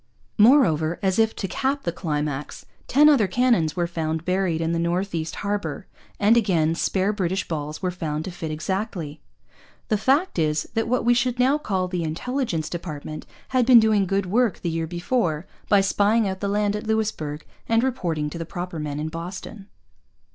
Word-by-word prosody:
Moreover, 175 - +5
as 190 +1 +1
if 225 0 +2
to 195 - -3
cap 275 +7 -1
the 170 - -1
climax, 150 -4 -4 0.2
ten 295 +3 +5
other 270 -9 +5
cannon 235 -4 +2
were 175 - 0
found 160 -1 -3
buried 180 -3 0
in 165 0 -1
the 170 - 0
North 175 +3 -1
East 160 -1 -3
Harbour; 205 0 -2 0.3
and 210 +3 +5
again 170 -8 +2
spare 190 +4 0
British 190 -1 -1
balls 150 +1 -4
were 180 - 0
found 160 -3 -4
to 185 - -5
fit 165 -2 -6
exactly! 160 -1 -4 0.7
The 215 -3 +1
fact 275 - +2
is 155 -1 +1
that 225 0 0
what 250 0 0
we 240 - +5
should 245 0 0
now 265 +4 +3
call 190 -9 -1
the 180 -2 -2
Intelligence 165 - -2
Department 155 -3 -6 0.2
had 255 -1 +2
been 245 -1 +8
doing 215 -3 +3
good 195 +1 0
work 225 +3 +1
the 170 - -2
year 165 0 -2
before 175 -2 -1 0.2
by 200 -1 +5
spying 205 +3 +2
out 190 0 -3
the 200 - -2
land 205 0 +1
at 210 +1 -5
Louisbourg 205 -9 -2 0.2
and 230 +1 +3
reporting 170 -13 -1
to 170 - -6
the - - -2
proper 175 -2 -5
men 150 -1 -4
in 155 +1 -3
Boston. 185 +5 -7
185 Hz, 185 wpm, -24 LUFS, 160-220 Hz, 0.7 s, been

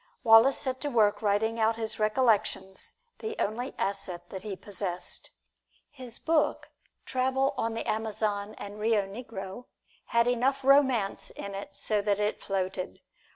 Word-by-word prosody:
Wallace 230 +3 +7
set 260 -1 -2
to 290 - -1
work 210 -5 +3
writing 220 +2 +1
out 225 +1 +3
his 220 -1 -3
recollections, 215 -4 +1 0.2
the 440 +1 -4
only 240 +5 -2
asset 185 -3 -2
that 190 - -5
he 210 -3 -5
possessed. 185 -2 -4 0.6
His 255 -5 -8
book, 315 -2 +1 0.3
"Travel 265 +1 +1
on 225 0 -1
the 230 - -3
Amazon 215 -1 -1
and 205 +1 -7
Rio 215 -1 +3
Negro," 200 0 -7 0.4
had 235 0 +3
enough 260 +3 +1
romance 265 -7 +3
in 200 - -7
it 195 0 -7
so 210 -2 +1
that 205 0 +1
it 210 0 -1
floated. 190 -1 -3
220 Hz, 145 wpm, -29 LUFS, 200-250 Hz, 0.6 s, Wallace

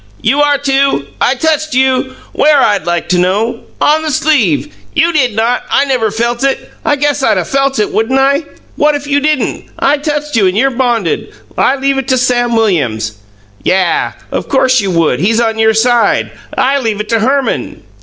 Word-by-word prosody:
"You 285 +2 +2
are, 290 -1 +3
too! 275 - 0 0.2
I 255 - +2
touched 310 0 -1
you." 260 0 +1 0.2
"Where, 300 0 +3
I'd 205 -8 +1
like 175 -1 -1
to 180 - +2
know!" 210 +6 -1
"On 310 +1 +3
the 315 - -3
sleeve." 280 - +1 0.2
"You 330 +2 +2
did 255 -8 +1
not! 230 +3 0
I 280 - +2
never 250 -5 0
felt 235 +3 -2
it. 275 -1 -1
I 295 - +2
guess 290 0 0
I'd 270 - +2
'a' - - -1
felt 275 0 0
it, 210 - -1
wouldn't 225 +5 +1
I?" 280 +3 +2 0.3
"What 295 0 +2
if 290 0 -5
you 285 0 +1
didn't? 300 -2 -1
I 285 +1 +1
touched 295 -1 -3
you, 205 -4 +3
and 185 +2 -1
you're 270 +4 +2
bonded. 240 -7 -1 0.2
I 265 - +2
leave 275 0 0
it 265 - -5
to 260 - +2
Sam 245 -2 +1
Williams." 120 - 0 0.4
"Yah! 185 - 0 0.4
Course 260 -2 +3
you 200 - -2
would! 165 -7 +1
He's 220 +7 +1
on 225 -1 0
your 220 0 +3
side! 240 +1 +2 0.3
I 275 +2 +2
leave 220 -5 -2
it 210 - -5
to 230 - +2
Herman." 270 +4 -1
255 Hz, 195 wpm, -12 LUFS, 220-280 Hz, 0.4 s, are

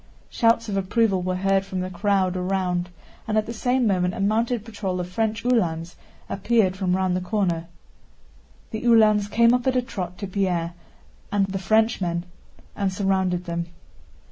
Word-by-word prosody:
Shouts 230 -1 +2
of 200 -2 -2
approval 195 0 +1
were 185 0 -1
heard 195 +1 +2
from 190 -1 -4
the 185 0 -4
crowd 190 0 +1
around, 180 -1 -1 0.4
and 215 -1 0
at 215 - +2
the 230 - -5
same 245 +2 +1
moment 180 -3 +1
a - - -6
mounted 220 +3 0
patrol 200 -5 -3
of 175 - -3
French 220 +5 -2
Uhlans 175 -9 0 0.3
appeared 195 -2 +1
from 185 -1 0
round 185 -1 +1
the 185 - -1
corner. 180 -4 -1 1.0
The 220 +1 -4
Uhlans 215 -3 +5
came 235 +2 +4
up 250 +1 0
at 260 - +2
a 250 - +3
trot 180 -7 -5
to 200 - -5
Pierre 180 -3 -1 0.6
and 205 -1 +2
the 195 0 -4
Frenchman 190 -4 +1 0.5
and 195 -2 0
surrounded 185 -2 0
them. 170 -1 -3
195 Hz, 170 wpm, -24 LUFS, 180-220 Hz, 1.0 s, Uhlans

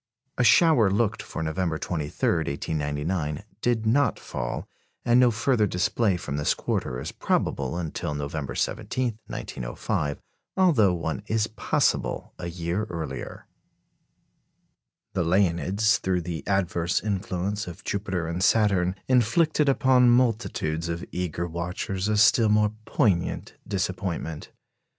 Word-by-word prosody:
A - - +4
shower 125 - +5
looked 105 +2 0
for 80 - -5
November 80 +1 -1
23, 75 -3 -2
1899, 75 +2 -2 0.2
did 120 -2 +1
not 125 +2 +3
fall, - - -5 0.4
and 120 +1 +5
no 125 -1 +6
further 115 -1 +2
display 90 +2 +1
from 70 -4 -4
this 75 - +1
quarter 60 - -2
is 65 - -5
probable 70 +4 -1
until 80 -3 -3
November 75 0 -4
17, 120 -4 -2
1905, 65 +4 -3 0.4
although 150 - +5
one 80 +2 -3
is 110 -1 +1
possible 110 0 -1
a 85 - -4
year 85 +4 -2
earlier. 85 -6 -6 1.7
The - - +1
Leonids, 95 +4 +2
through 90 -1 0
the 85 -1 -5
adverse 90 -3 +1
influence 100 0 -2
of 90 +1 -9
Jupiter 95 -4 -2
and 85 +2 -3
Saturn, 95 -5 +3
inflicted 140 +5 +3
upon 130 -2 +4
multitudes 110 -9 +1
of 85 +1 -3
eager 90 -1 -2
watchers 90 +3 -3
a 105 0 +1
still 110 +1 +5
more 105 0 +3
poignant 100 - 0
disappointment. 95 -5 -3
95 Hz, 120 wpm, -26 LUFS, 85-110 Hz, 1.7 s, no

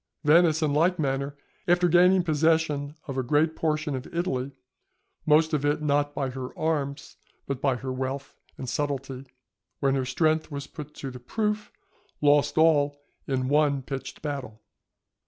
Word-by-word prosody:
Venice 160 +1 +4
in 150 -2 +1
like 170 +5 +3
manner, 140 -1 -2 0.3
after 175 0 +4
gaining 180 +2 +5
possession 155 -2 +1
of 135 -2 -3
a - - +2
great 150 +5 +1
portion 155 -2 -1
of 130 - -7
Italy 140 -6 -2 0.8
(most 155 +1 +4
of 145 -2 +1
it 145 +1 +1
not 145 0 +1
by 135 -2 -2
her 130 -1 -7
arms 145 -3 -2 0.3
but 140 -1 -4
by 135 -3 +2
her 130 +2 -4
wealth 135 +1 -4 0.2
and 130 - -6
subtlety), 135 0 -3 0.5
when 135 -1 +2
her 135 -1 0
strength 155 +4 +1
was 140 -2 -5
put 150 -1 -10
to 135 - -6
the 125 - -9
proof, 210 - -2 0.5
lost 145 0 +3
all 145 -3 +4 0.3
in 130 -2 -1
one 145 -1 +2
pitched 135 +2 -7
battle. 135 -8 -5
145 Hz, 155 wpm, -26 LUFS, 135-160 Hz, 0.8 s, gaining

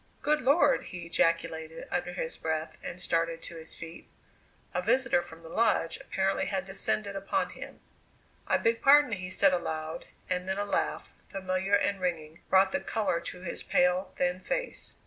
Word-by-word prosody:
"Good 300 0 +2
Lord!" 285 +2 +4
he 175 -1 -7
ejaculated 165 -1 0
under 175 - -1
his 165 -2 -3
breath 160 0 -3
and 180 - -6
started 165 -1 0
to 170 - -6
his 160 0 -5
feet. 165 0 -9 0.6
A 180 - 0
visitor 240 -1 +3
from 165 -1 -9
the - - -10
Lodge 165 -5 +1
apparently 195 0 -1
had 190 -2 -2
descended 200 +1 -1
upon 195 0 -1
him. - - -10 0.7
"I - - +3
beg 230 0 +1
pardon," 290 -1 +7
he 185 -3 -3
said 190 0 +4
aloud, 160 -3 -3 0.2
and 180 0 -2
then 190 - 0
a 205 - -1
laugh, 205 - -1 0.2
familiar 190 +1 0
and 200 -1 +1
ringing, 165 -3 -2
brought 190 0 +5
the 285 - 0
colour 205 -6 0
to 180 +1 -7
his 185 - -4
pale, 180 +1 +2
thin 180 0 +1
face. - - -3
185 Hz, 170 wpm, -29 LUFS, 165-200 Hz, 0.7 s, pardon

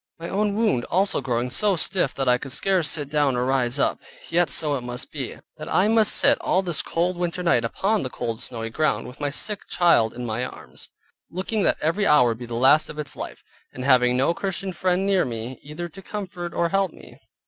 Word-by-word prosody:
My 170 0 -7
own 205 +1 0
wound 210 - +1
also 195 -3 +1
growing 125 -1 -1
so 205 +8 +2
stiff 175 -3 0
that 135 -1 -2
I 125 0 +4
could 135 - -7
scarce 185 -2 +1
sit 145 -3 -1
down 145 -2 +1
or 125 0 0
rise 130 -1 +1
up; - - +1 0.3
yet 175 +1 +2
so 150 -2 +3
it 135 - -2
must 120 0 -6
be, - - -5 0.2
that - - -7
I 190 - +3
must 220 -1 +4
sit - - +4
all 190 - +1
this 175 -4 0
cold 175 +2 -1
winter 175 0 -2
night 170 -9 +3
upon 200 - 0
the 130 - -3
cold 115 -2 -4
snowy 115 -2 -4
ground, 155 +5 0
with 125 - -11
my 145 -1 -1
sick 205 +8 -4
child 145 -11 +3
in 125 0 -5
my 115 +2 -2
arms, 125 - -9 0.4
looking 195 +4 -2
that - - +2
every 170 +7 +1
hour 125 -5 +5
would 115 0 -3
be 120 - -7
the 115 - -5
last 135 +6 +4
of 150 - -9
its 150 -2 -5
life; - - -7 0.3
and 125 - -6
having 125 -2 +4
no 135 +6 +2
Christian 190 +1 -4
friend 185 +1 0
near 195 -2 +3
me, 120 +1 -5
either 155 +4 -6
to 195 +4 -12
comfort 185 -4 -6
or 170 0 0
help 195 -1 +1
me. - - -15
155 Hz, 225 wpm, -24 LUFS, 125-185 Hz, 0.4 s, hour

